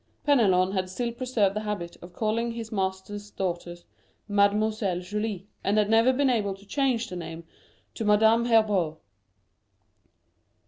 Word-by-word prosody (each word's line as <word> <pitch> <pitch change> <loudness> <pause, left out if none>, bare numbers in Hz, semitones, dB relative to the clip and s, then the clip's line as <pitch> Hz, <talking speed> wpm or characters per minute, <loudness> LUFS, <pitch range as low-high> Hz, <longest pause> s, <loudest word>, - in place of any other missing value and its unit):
Penelon 195 -10 +4
had 185 -1 -1
still 235 +5 -2
preserved 235 -5 0
the - - 0
habit 210 -5 -4
of 175 - -11
calling 230 +4 -1
his 230 -1 -7
master's 195 +1 -3
daughter 175 -3 -4 0.5
"Mademoiselle 205 -2 +1
Julie," 205 +1 -4 0.2
and 205 +2 +1
had 210 0 +2
never 225 +3 +5
been 275 +2 +1
able 210 -6 0
to 195 +1 -18
change 250 0 0
the 185 - -7
name 170 -1 -7 0.5
to - - -4
Madame 220 +2 +4
Herbault. 205 -9 +2
210 Hz, 140 wpm, -26 LUFS, 190-225 Hz, 0.5 s, never